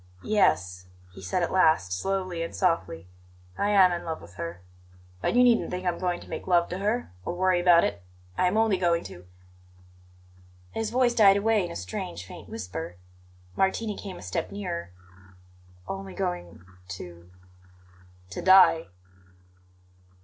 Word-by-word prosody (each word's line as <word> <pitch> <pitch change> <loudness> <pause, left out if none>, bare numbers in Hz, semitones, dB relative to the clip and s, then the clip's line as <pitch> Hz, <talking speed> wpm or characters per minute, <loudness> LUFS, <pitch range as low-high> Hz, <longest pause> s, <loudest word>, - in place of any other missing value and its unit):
"Yes," 90 - +1 0.3
he 95 - -11
said 95 - -1
at - - -1
last, 155 - +3
slowly 185 - -2
and 165 - -5
softly. 165 - -1 0.5
"I 205 - 0
am 195 -3 +6
in 175 -1 -3
love 160 -1 -4
with 85 +1 -14
her. 85 0 -7 0.6
But - - 0
you 250 - +6
needn't 240 -2 +3
think 180 +1 -5
I - - +3
am 170 - -4
going 180 -1 -1
to - - -13
make - - -6
love 175 -2 +3
to 180 - -4
her, 215 - -1
or 175 - -4
worry 185 0 +2
about 175 -1 +6
it. 85 - -2 0.3
I 180 - +2
am 190 +4 0
only 220 -3 +3
going 170 -2 +1
to 90 0 -11 0.7
" 90 0 -27
His 225 -1 -2
voice 245 0 +2
died 200 -4 +6
away 215 0 +2
in 175 - -4
a - - -7
strange, 90 -1 -5
faint - - -11
whisper. 90 -5 -6 0.6
Martini 205 +2 0
came 195 -2 -8
a - - -11
step 90 0 -3
nearer. 180 - -5 1.0
"Only 95 -1 -6
going 90 0 -4 0.3
to 85 -1 -11 0.5
" 90 0 -27
"To - - -5
die." 185 -3 +6
170 Hz, 165 wpm, -27 LUFS, -, 1.0 s, am